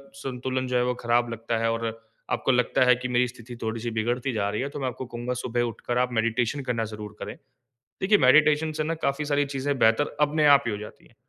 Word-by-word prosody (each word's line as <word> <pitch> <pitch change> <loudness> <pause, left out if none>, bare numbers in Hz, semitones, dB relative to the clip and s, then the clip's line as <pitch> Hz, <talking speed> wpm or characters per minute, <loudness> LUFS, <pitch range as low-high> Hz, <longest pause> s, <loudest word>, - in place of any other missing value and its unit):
संतुलन 130 -1 -3
जो 125 - -2
है 125 - +3
वो 125 - +1
ख़राब 120 0 +2
लगता 115 0 -2
है 115 0 +1
और 115 0 -2 0.5
आपको - - +1
लगता 125 0 +2
है 125 -1 +6
कि 125 0 -5
मेरी 125 0 +2
स्थिति 120 0 -10
थोड़ी-सी 115 +1 -3
बिगड़ती 120 +3 -1
जा 100 -2 0
रही 105 +4 -2
है, 140 - -2
तो 145 - -7
मैं 135 - -1
आपको 125 +1 -5
कहूँगा 120 +1 -4
सुबह 120 -1 -2
उठकर 120 +2 -4
आप 125 0 +1
मेडिटेशन 115 +4 0
करना 115 -2 0
ज़रूर 105 0 -8
करें। - - -6 0.7
देखिए 205 +2 +4
मेडिटेशन 150 +3 +4
से 155 - +2
ना 165 +2 -1
काफ़ी 140 +2 0
सारी 145 -1 +1
चीज़ें 140 0 -2
बेहतर 115 +7 +3
अपने 150 +1 +3
आप 140 - +2
ही - - 0
हो 105 - -3
जाती 105 +1 -11
हैं। - - -27
125 Hz, 235 wpm, -26 LUFS, 115-140 Hz, 0.7 s, है